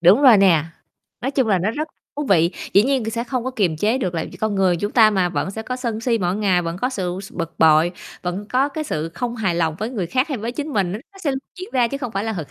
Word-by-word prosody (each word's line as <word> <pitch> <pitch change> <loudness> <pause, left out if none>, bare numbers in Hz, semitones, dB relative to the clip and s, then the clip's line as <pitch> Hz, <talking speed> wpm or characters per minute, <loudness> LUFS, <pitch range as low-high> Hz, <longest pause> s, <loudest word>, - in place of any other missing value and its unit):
Đúng 185 +10 +6
rồi 255 -6 +8
nè, 180 -6 +4 0.6
nói 260 +2 -1
chung 265 -4 +1
là 195 -3 +3
nó 190 +5 0
rất 305 +7 -3 0.3
thú 295 - -2
vị. 170 -3 +4 0.2
Dĩ 200 - +6
nhiên 255 -3 0
sẽ 230 +1 -2
không 250 -1 -3
có 260 - -1
kiềm 190 -10 0
chế 215 +10 +1
được, 185 -8 -2
là 160 - -1
vì - - -10
con 215 -1 -1
người 190 -3 +3
chúng 205 +5 -2
ta 220 -3 +6
mà, 190 -4 +1
vẫn 185 - -2
sẽ 220 +3 -6
có 250 +3 -4
sân 235 -4 -3
si 230 -1 +1
mỗi 180 -2 0
ngày, 190 -4 +2
vẫn 165 0 -3
có 250 - 0
sự 185 -7 -3
s - - -11
bực 165 -2 -5
bội, 160 +2 +5 0.3
vẫn 185 +3 -3
có, 265 +4 +2
cái, 310 +2 -4
sự 155 - -2
không 245 +2 -3
hài 195 -6 0
lòng 165 -2 0
với 220 +3 -3
người 205 -9 -2
khác 255 - 0
hay 275 - -2
với 230 +3 -4
chính 295 +4 -4
mình, 190 -6 0
nó 205 - -3
nó 390 - -16
sẽ 290 - +2 0.3
diễn 370 - -6
ra, 245 -3 +3
chứ 275 - -4
không 250 -5 -5
phải 195 +2 -2
là 225 - -1
thực 165 -8 -6
215 Hz, 300 wpm, -21 LUFS, 180-250 Hz, 0.6 s, rồi